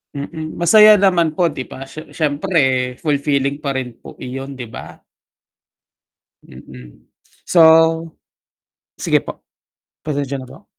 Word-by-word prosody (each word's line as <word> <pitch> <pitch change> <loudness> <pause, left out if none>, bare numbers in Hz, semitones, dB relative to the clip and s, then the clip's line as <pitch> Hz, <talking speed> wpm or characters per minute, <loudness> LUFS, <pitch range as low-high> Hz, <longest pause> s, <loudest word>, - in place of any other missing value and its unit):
Mm, 155 +3 -7
masaya 215 +5 +7
naman 180 -6 +2
po 170 +1 +1
'di 135 -4 -6
ba, 135 0 -10
sye 155 +1 -11
siyempre 145 -5 0
fulfilling 140 -2 0
pa 140 -2 -4
rin 125 -3 -5
po - - -13
iyon, 135 +2 -7
'di 120 -3 -9
ba? - - -11 1.5
Mm. 60 -2 -15 0.4
So 175 - +2 1.4
sige - - +2
po, - - -9 0.6
pasensya 140 -2 -3
na 130 - -11
po. - - -15
140 Hz, 120 wpm, -18 LUFS, 130-160 Hz, 1.5 s, masaya